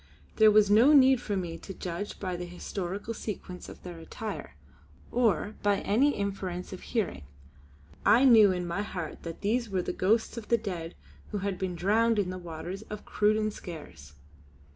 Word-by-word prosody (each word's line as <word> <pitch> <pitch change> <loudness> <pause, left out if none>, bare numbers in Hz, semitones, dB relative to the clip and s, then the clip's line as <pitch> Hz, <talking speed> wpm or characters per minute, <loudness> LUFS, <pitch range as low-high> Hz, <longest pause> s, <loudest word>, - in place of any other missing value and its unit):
There 220 -1 +7
was 210 -1 +5
no 235 +8 +7
need 265 -3 +6
for 205 -4 -2
me 170 -3 -4
to 195 - -9
judge 180 +4 -5
by 185 -2 -3
the 175 0 -5
historical 190 +4 -5
sequence 190 -5 -7
of - - -12
their 175 -2 -8
attire, 165 - -7 0.6
or 215 -3 +1
by 205 -1 +2
any 265 +8 +3
inference 190 -3 -4
of 185 - -8
hearing; 220 - -2 0.8
I 245 +5 +6
knew 220 -6 +8
in 180 -1 -2
my 175 +4 -2
heart 175 -6 -5
that 165 -1 -7
these 230 +3 0
were 185 -2 -1
the - - -3
ghosts 225 +5 +1
of 225 - -6
the 235 - +3
dead 180 -6 -5 0.3
who 210 - -3
had 195 -2 -2
been 185 -2 -2
drowned 220 +6 +2
in 190 -3 0
the 185 - -6
waters 175 +3 -6
of 210 -1 -7
the - - -19
Cruden 215 +1 +2
Skares. 85 - -10
200 Hz, 185 wpm, -29 LUFS, 180-215 Hz, 0.8 s, knew